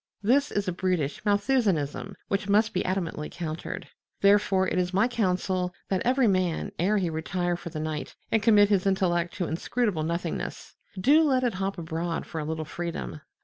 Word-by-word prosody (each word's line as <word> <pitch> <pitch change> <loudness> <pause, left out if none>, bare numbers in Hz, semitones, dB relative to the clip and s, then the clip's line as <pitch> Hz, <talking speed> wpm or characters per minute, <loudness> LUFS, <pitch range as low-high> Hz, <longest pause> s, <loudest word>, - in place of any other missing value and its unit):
This 280 +7 +3
is 205 -1 -1
a - - +1
brutish 175 -6 -1
Malthusianism 200 - +1
which 200 0 -1
must 215 +2 +3
be 180 - 0
adamantly 175 -5 -2
countered. 165 -2 -5 0.3
Therefore 200 -1 +4
it 180 - 0
is 180 0 -1
my 205 +5 +4
counsel 185 -5 0
that 190 -2 +1
every 255 +1 +3
man, 185 -4 0
ere 200 +5 +2
he 185 -3 +1
retire 175 +2 -1
for 170 - -7
the 155 - -5
night 155 -1 -4 0.2
and 225 - +3
commit 205 -2 +6
his 200 -2 +2
intellect 175 -3 +1
to 180 - -1
inscrutable 185 +2 -1
nothingness, 170 +2 -3 0.3
do 290 +11 +5
let 265 -5 +2
it 245 -3 +1
hop 195 +1 -2
abroad 165 0 -3
for 160 - -5
a - - -4
little 160 0 -3
freedom. 170 -1 -5
185 Hz, 180 wpm, -27 LUFS, 170-205 Hz, 0.3 s, commit